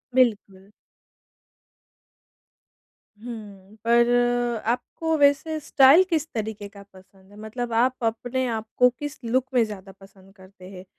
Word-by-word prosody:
बिल्कुल। 205 -6 0 2.5
हुँ, 210 -4 -10
पर 235 +1 +4 0.6
आपको 250 +7 -2
वैसे 290 +2 +2
स्टाइल 280 +4 +5
किस 320 -3 -1
तरीके 215 -2 -5
का 200 0 -14
पसंद 190 +1 -20
है? 205 - -16
मतलब 235 +2 -5
आप 250 +2 +1
अपने 245 +3 -2
आप 225 -1 -3
को 250 0 +6
किस 290 0 -6
लुक 250 +3 0
में 245 -2 +4
ज़्यादा 200 -3 -8
पसंद 195 0 -19
करते 185 -1 -15
हैं? 185 -1 -11
225 Hz, 125 wpm, -24 LUFS, 200-255 Hz, 2.5 s, को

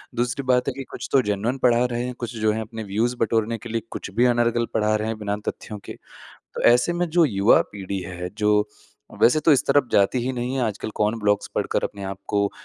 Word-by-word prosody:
दूसरी 125 +3 -1
बात 125 0 +2
है 140 - 0
कि 135 +1 -6
कुछ - - -6
तो 135 - +5
जेन्युइन 105 +4 -1
पढ़ा 120 -1 +4
रहे 120 0 -1
हैं, 125 - -4
कुछ 120 -1 -5
जो 110 -1 +1
हैं 110 +1 -2
अपने 110 0 -7
व्यूज़ 110 +5 -1
बटोरने 115 0 +1
के 115 +2 -10
लिए 115 0 -1
कुछ - - -6
भी 120 - +4
अनर्गल 120 -1 +2
पढ़ा 110 -1 +2
रहे 110 0 -1
हैं 110 0 -3
बिना 105 -1 -2
तथ्यों 105 - -5
के। - - -7 0.6
तो - - -4
ऐसे 125 +8 +2
में 175 0 -1
जो 170 0 +4
युवा 100 -5 +4
पीढ़ी 100 -1 -4
है, 90 0 -6
जो 105 0 +2 0.5
वैसे 155 +6 +5
तो 155 - +5
इस 140 +1 +3
तरफ 145 -3 +3
जाती 100 +5 +3
ही 130 - -1
नहीं 125 +1 -3
है, 130 - 0
आजकल 110 -1 -3
कौन 105 +2 +1
ब्लॉग्स 105 -1 +1
पढ़कर - - 0
अपने 100 -1 -5
आपको 100 +1 -1
115 Hz, 230 wpm, -23 LUFS, 105-125 Hz, 0.6 s, तो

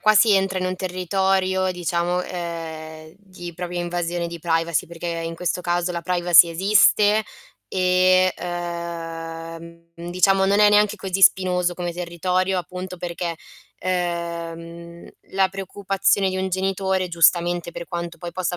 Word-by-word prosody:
qua 215 0 +4
si 215 0 +6
entra 190 -1 +1
in 185 - -2
un 185 - -3
territorio 185 +1 0
diciamo, 175 0 -1
uhm, 160 -3 -6
di 185 -3 -10
propria 175 0 -4
invasione 175 0 -2
di 170 0 -7
privacy, 165 -1 0
perché 170 +1 -8
in 165 0 -4
questo 180 +1 -2
caso 175 0 -1
la 170 0 -4
privacy 175 -1 +5
esiste 205 +4 +4 0.5
e, 185 0 +3
uhm, 170 -1 -6 0.3
diciamo 190 +2 +3
non 200 +1 +3
è 210 0 +6
neanche 210 0 +3
così 195 -1 -3
spinoso 180 -2 +4
come 175 -1 -4
territorio, 180 +2 -1
appunto, 180 +1 -6
perché, 170 -1 -4 0.5
ehm, 170 -1 -4 0.3
la 190 0 +2
preoccupazione 195 0 0
di 185 - -3
un 190 - -1
genitore, 190 0 -1
giustamente 175 0 +2
per 170 - -6
quanto 170 0 -5
poi 175 +1 -7
possa 180 0 -2
175 Hz, 140 wpm, -22 LUFS, 170-185 Hz, 0.5 s, si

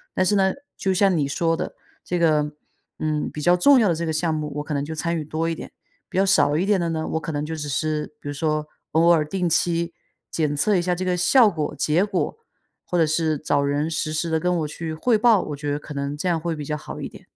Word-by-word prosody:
但 185 - +2
是 205 +2 +3
呢， 190 -1 +3 0.3
就 190 - 0
像 195 -1 +3
你 145 -3 +1
说 165 +3 0
的， - - -5 0.3
这 180 - -2
个， 150 -3 +2 0.5
嗯， 155 -1 -1
比 150 - -7
较 175 +3 +4
重 270 +8 +6
要 215 - +4
的 170 - +3
这 170 +1 -3
个 - - 0
项 160 +1 0
目， 150 -1 -3
我 145 - -2
可 150 - -5
能 140 0 -1
就 160 +2 -5
参 170 +2 -1
与 155 - -3
多 155 +2 -2
一 - - -1
点。 - - -9 0.4
比 - - -5
较 195 - +4
少 150 -6 +4
一 185 - +1
点 205 -1 +3
的 170 - -1
呢， 160 -1 -2
我 160 - -1
可 160 - -4
能 145 0 -2
就 160 +1 -4
只 150 -2 -5
是， 150 +2 -1
比 - - -10
如 145 - -3
说 155 0 -1 0.3
偶 165 +2 +4
尔 160 -3 +4
定 180 +3 -1
期 170 0 +1 0.4
检 150 -3 0
测 205 +8 +3
一 180 - +3
下 180 0 0
这 185 +1 -3
个 180 -1 +1
效 220 +6 +5
果、 155 -5 -3
结 160 +5 +2
果， 210 - -2 0.5
或 180 - -2
者 165 - +4
是 155 0 +1
找 145 -1 0
人 145 +2 0
实 155 -1 -1
时 160 +2 -1
地 160 - +1
跟 180 +1 0
我 155 - -1
去 160 +1 -5
汇 220 +8 +2
报， 220 -3 +4
我 145 - -5
觉 145 0 -4
得 145 - -1
可 150 - -9
能 140 +1 -3
这 180 - -2
样 170 -2 +2
会 165 +1 -2
比 150 -2 -6
较 150 - -2
好 150 - -8
一 - - -4
点。 - - -14
160 Hz, 295 characters per minute, -23 LUFS, 150-175 Hz, 0.5 s, 重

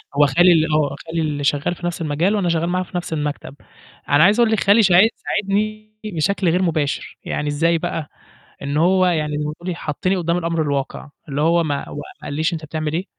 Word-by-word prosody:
هو 145 +1 +5
خالي 175 +6 +5
ال 160 -1 +3
آه، 145 -2 +1
خالي 165 0 -2
اللي 150 -2 -2
شغّال 145 +4 0
في 175 - -8
نَفْس 175 -1 -4
المجال 165 +6 +1
وأنا 190 -4 0
شغّال 170 0 0
معاه 185 +1 0
في 180 - -6
نَفْس 175 -2 -4
المكتب، 145 -2 -4 0.5
أنا 145 +2 +5
عايزة 205 +6 +4
أقول 230 -2 +3
لِك 220 - +2
خالي 205 +3 +4
شاعيد 190 +3 +6
ساعدني 215 +1 -2
بشكل 190 0 0
غير 180 +3 +1
مباشر، 155 -5 -2
يعني 150 - -3
إزاي 165 +3 +1
بقى، 165 -2 -4 0.5
إن 140 +1 -2
هو 185 +3 +3
يعني 155 -4 0
زي 150 - -2
ما 150 - -3
تقولي 175 +2 -5
حطّني 170 +5 -2
قدّام 170 -1 0
الأمر 165 -1 -1
الواقع، 140 -1 -3 0.2
اللي 140 +1 -2
هو 170 +2 +3
ما 145 -3 -3
هو - - -8
ما 145 - -5 0.3
قالش 155 +4 -1
لي - - -1
أنت 155 -1 -7
بتعمل 155 0 -3
إيه، 175 +4 -2
165 Hz, 225 wpm, -20 LUFS, 150-180 Hz, 0.5 s, شاعيد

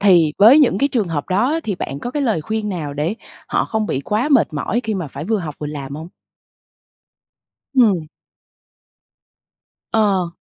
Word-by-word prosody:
thì 175 -6 +5
với 230 +8 +8
những 260 -10 +4
cái 280 - +2
trường 225 -9 -1
hợp 150 -3 -3
đó 205 +8 +2
ấy 325 +2 0
thì 215 -10 -3
bạn 140 -5 -5
có 240 - -5
cái 290 +3 -2
lời 225 - +1
khuyên 215 +6 -3
nào 165 -7 -4
để 150 +7 -1 0.3
họ - - +1
không 220 -1 -2
bị 135 - -2
quá 215 - -1
mệt 275 - +3
mỏi 195 +10 -1
khi 220 -1 -1
mà 180 -6 -4
phải 140 +2 -7
vừa 220 +3 0
học 160 -6 -5
vừa 150 - -4
làm 140 -2 -6
hông? 160 +3 -7 1.7
Ừm. 205 - +3 1.8
Ờ. 200 -5 +2
195 Hz, 185 wpm, -19 LUFS, 155-225 Hz, 1.8 s, với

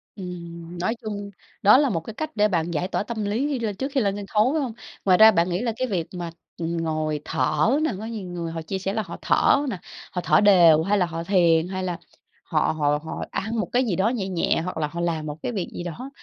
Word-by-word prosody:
Ừm, 170 -2 -8
nói 185 +7 0
chung 205 -2 -5 0.3
đó 210 +5 +7
là 285 0 +3
1 175 -8 0
cái 165 +7 -9
cách 310 +7 -4
để 210 -1 +4
bạn 170 -3 -1
giải 170 +3 -1
tỏa 195 - -1
tâm 220 -2 -4
lý 225 +8 0
khi 280 -4 -1
lên 215 -3 -2
trước 270 +7 -3
khi 270 -2 +1
lên 200 -2 0
sân 205 - -5
khấu, 220 +8 +2
phải 315 - +1
hông? 255 -5 -3 0.3
Ngoài 185 -2 +5
ra 220 +2 +9
bạn 170 -1 +2
nghĩ 180 +2 -1
là 240 -2 0
cái 255 - -1
việc 175 -7 -2
mà, 175 -2 -5 0.3
ừm, 170 0 -2
ngồi 155 -2 -1
thở 150 +7 +1
nè, 315 - +1
có 215 - -6
nhiều 220 -4 -5
người 170 -2 -4
họ 165 0 -4
chia 190 +4 -4
sẻ 195 +1 -2
là 220 - 0
họ 205 - -8
thở 285 +1 +3
nè, 195 -7 -4 0.3
họ 180 - -2
thở - - +5
đều 170 -6 +6
hay 205 +4 +2
là 185 - +3
họ 165 -1 -5
thiền 170 -3 +3
hay 185 0 -4
là 180 -2 -2 0.5
họ - - +1
họ 145 0 +2
họ 160 - -5
ăn 220 +2 -2
một 190 - -1
cái 250 +1 +2
gì 205 -7 0
đó 195 +5 +2
nhẹ 220 -6 -2
nhẹ 180 -3 0
hoặc 180 0 -5
là 155 -2 0
họ 170 +3 -7
làm 165 -3 -1
1 150 0 -5
cái - - -1
việc 195 -6 -3
gì - - -5
đó 230 - -6
185 Hz, 270 wpm, -24 LUFS, 170-220 Hz, 0.5 s, ra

